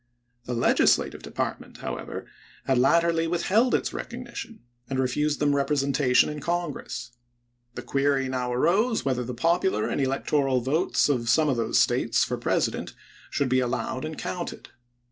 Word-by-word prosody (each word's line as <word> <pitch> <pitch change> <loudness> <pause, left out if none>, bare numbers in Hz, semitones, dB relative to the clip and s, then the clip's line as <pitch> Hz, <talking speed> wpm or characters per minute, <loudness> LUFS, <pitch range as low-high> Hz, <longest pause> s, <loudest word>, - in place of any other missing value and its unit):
The 125 - -3
Legislative 120 - +2
Department, - - -5
how - - -4
ever, - - -7 0.4
had 130 -2 +2
latterly 165 +4 +3
withheld 195 +8 +2
its - - -1
recognition, 230 - -7 0.3
and 135 - -2
refused 145 +3 0
them 145 -1 +2
representation 140 -2 +2
in 150 0 -5
Congress. 170 -7 -3 0.6
The 120 - -6
query 135 +1 +1
now 125 -1 -2
arose 205 - +2
whether 130 -2 0
the 125 +1 -5
popular 170 - +1
and - - -1
electoral 135 0 +1
votes 145 +8 +1
of 120 -5 0
some 155 +2 +4
of 130 - +1
those 115 - +1
States - - +3
for - - -2
President - - -1 0.3
should 140 - 0
be 130 0 +2
allowed 130 +1 -2
and 155 0 -5
counted. 180 -1 -5
140 Hz, 150 wpm, -26 LUFS, 130-165 Hz, 0.6 s, some